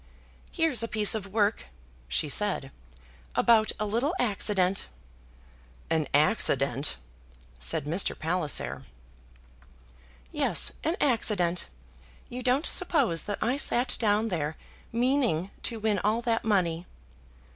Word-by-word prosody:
"Here's 325 - +1
a 230 - 0
piece 210 -2 +3
of 210 -3 -3
work," 205 +1 0 0.4
she 65 - 0
said, 150 -4 -1 0.6
"about 220 -2 +4
a 215 - -1
little 240 - -1
accident." 200 -4 +1 1.0
"An 160 -3 +1
accident!" 140 - +1 0.6
said 65 - +1
Mr. 170 +6 +1
Palliser. 160 -2 0 1.5
"Yes, - - +2
an 325 +3 0
accident. 205 -9 +1 0.6
You 250 +1 -6
don't 255 +4 +1
suppose 275 - +1
that 205 - -3
I 245 +5 0
sat 250 -3 0
down 215 0 +1
there 160 -4 -3 0.3
meaning 235 - +1
to 230 -2 -2
win 215 -2 0
all 220 +4 0
that 230 -1 0
money?" 180 -5 0
210 Hz, 115 wpm, -27 LUFS, 170-235 Hz, 1.5 s, about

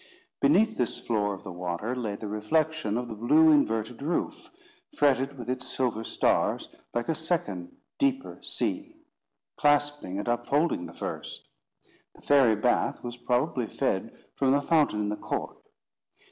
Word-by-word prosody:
Beneath 200 +11 +4
this 125 - 0
floor 105 -3 0
of 95 - -14
the 100 - -7
water, 90 +6 -3
lay 110 -5 -3
the 105 - -6
reflection 110 +3 0
of 125 0 -3
the 115 - -6
blue 150 +9 +5
inverted 115 -5 +1
roof, 160 +4 -2 0.5
fretted 140 -1 +2
with 120 -2 -7
its 125 0 -3
silver 120 -4 -1
stars, - - +1 0.2
like 120 0 -2
a - - +2
second 150 - -3 0.2
deeper 270 -1 0
sea, 300 +1 -3 0.6
clasping 145 -9 +1
and 105 - -4
upholding 120 - +1
the - - -12
first. - - -6 0.7
The - - -18
fairy 135 -6 +5
bath 120 +4 +1
was 120 -1 -5
probably 125 0 0
fed - - -2 0.2
from 135 -1 +2
the 145 - +3
fountain 150 -10 +2
in 105 - -1
the 105 - -2
court. - - -4
125 Hz, 150 wpm, -28 LUFS, 110-150 Hz, 0.7 s, blue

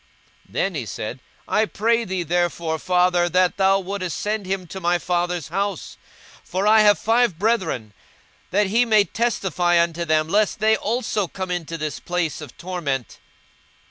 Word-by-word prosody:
42:016:027 - - -23
Then 195 - 0
he 140 -7 -3
said, 105 +7 -5 0.3
I 215 +1 +2
pray 230 +2 +1
thee 185 -2 -2
therefore, 170 -1 -1
father, 180 0 +2
that 180 +1 +2
thou 195 0 +4
wouldest 185 -2 -4
send 210 -2 -2
him 190 -1 -2
to 190 +3 -8
my 175 -1 +2
father's 175 -2 -2
house: 200 -3 -3 0.5
42:016:028 - - -29
For 185 +3 -1
I 215 +1 +6
have 205 -1 +5
five 230 -5 +2
brethren; 185 - -1 0.6
that 205 +2 +2
he 225 +5 +3
may 215 -3 +4
testify 185 -7 +1
unto 170 0 0
them, 155 -1 +1
lest 205 +4 +1
they 220 +1 +3
also 220 -3 -1
come 185 +1 -5
into 165 -2 -3
this 155 -1 -4
place 175 -3 -2
of 145 -5 -11
torment. 150 - -4
185 Hz, 170 wpm, -22 LUFS, 170-205 Hz, 0.6 s, I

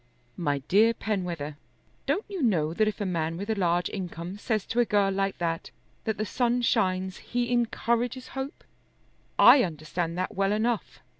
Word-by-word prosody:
"My 145 -4 0
dear 225 +4 +5
Penwether, 175 -8 -3 0.5
don't 410 - 0
you 390 -5 -5
know 165 - +2
that 215 +4 +2
if 215 - -2
a 205 - -1
man 165 -3 -1
with 200 +4 -3
a - - +3
large 175 -3 +1
income 180 0 -6
says 215 -2 -1
to 235 - -1
a - - +6
girl 200 -2 +2
like 195 0 -1
that 165 -1 -2 0.4
that 220 -1 -1
the 215 - -1
sun 245 +3 +1
shines 185 -3 +1
he 245 0 -2
encourages 240 +1 0
hope. 270 +3 -6 0.7
I 275 - +9
understand 165 - -3
that 185 - -2
well 195 +1 +1
enough. 225 +2 -1
195 Hz, 170 wpm, -27 LUFS, 175-230 Hz, 0.7 s, I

